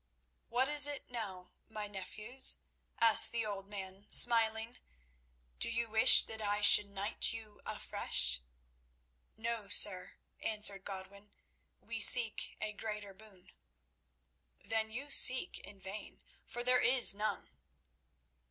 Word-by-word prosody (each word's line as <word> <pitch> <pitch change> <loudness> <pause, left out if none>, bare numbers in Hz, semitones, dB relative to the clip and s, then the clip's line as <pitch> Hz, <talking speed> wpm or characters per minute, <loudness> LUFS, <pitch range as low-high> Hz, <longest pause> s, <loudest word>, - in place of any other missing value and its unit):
"What 250 +3 -1
is 295 -1 +7
it 290 -3 -9
now, 190 -6 -9 0.2
my 215 -1 -8
nephews?" 210 +6 -7 0.4
asked 230 -1 +6
the 230 -1 -3
old 195 -2 -8
man, 195 0 -11
smiling. 225 0 +3 0.8
"Do - - +1
you 230 0 -4
wish 225 +4 +5
that 220 0 -9
I 205 0 -3
should 205 0 +5
knight 200 +2 -4
you 220 -2 -13
afresh?" 65 0 -4 1.0
"No, 225 -2 -6
sir," 185 -3 +1 0.3
answered 210 -3 -1
Godwin; 200 +1 -12 0.4
"we 230 -1 -9
seek 225 +1 +3
a 215 0 -6
greater 210 -2 -9
boon." 195 -2 -18 1.1
"Then 220 0 -4
you 270 +6 -9
seek 255 -1 +3
in 200 - -14
vain, 195 +3 -11 0.2
for 240 -1 -8
there 250 0 0
is 250 -4 +5
none." 210 -1 -5
215 Hz, 125 wpm, -32 LUFS, 200-230 Hz, 1.1 s, is